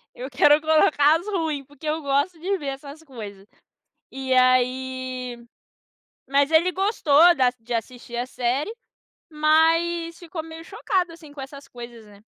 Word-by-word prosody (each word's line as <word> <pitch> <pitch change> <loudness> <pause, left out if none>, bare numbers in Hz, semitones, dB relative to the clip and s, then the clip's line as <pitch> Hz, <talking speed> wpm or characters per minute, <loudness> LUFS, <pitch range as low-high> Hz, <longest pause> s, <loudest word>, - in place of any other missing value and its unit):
Eu 255 +3 -7
quero 295 +3 +5
colocar 310 -1 +4
as 380 - -12
ruim, 320 -8 -2
porque 290 +2 -12
eu 315 +1 -1
gosto 285 +5 0
de 390 +3 -1
ver 290 -4 -7
essas 280 +3 -7
coisas. 210 -8 -10 0.7
E 265 -1 -2
aí 255 0 +1 0.9
mas 280 +2 +2
ele 340 +3 +3
gostou 350 -4 +4
da 255 -2 +3
de 235 +2 -9
assistir 240 +1 -5
a 245 +1 -2
série, 260 - -2 0.6
mas 330 +2 +2
ficou 335 -2 -7
meio 325 0 -10
chocado 360 0 -2
assim 315 -3 -14
com 285 -2 -9
essas 275 0 -10
coisas, 235 -3 -11
né. 205 +1 -18
285 Hz, 150 wpm, -23 LUFS, 255-325 Hz, 0.9 s, quero